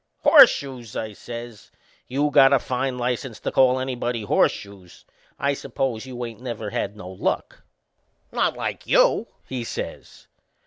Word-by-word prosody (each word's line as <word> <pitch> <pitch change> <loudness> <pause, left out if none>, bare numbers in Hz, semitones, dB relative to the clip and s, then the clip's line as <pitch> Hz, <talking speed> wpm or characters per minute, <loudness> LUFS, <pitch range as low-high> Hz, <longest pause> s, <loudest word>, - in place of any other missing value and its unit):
"Horseshoes!" 125 -5 +5
I 110 -1 -4
says. 120 0 -9 0.4
"You 145 +3 0
got 135 0 +6
a - - +7
fine 130 0 -2
license 125 -1 -3
to - - -2
call 130 0 +4
anybody 125 -3 -2
Horseshoes! 100 -2 -1 0.3
I 140 0 +1
suppose 130 -3 -3
you 125 -1 -5
ain't 115 0 -9
never 115 -4 -5
had 100 +2 -3
no 90 - -9
luck?" 95 0 -3 0.7
"Not - - 0
like - - -4
you," - - +4 0.2
he 130 -2 -4
says. - - -7
120 Hz, 140 wpm, -23 LUFS, 110-130 Hz, 0.7 s, a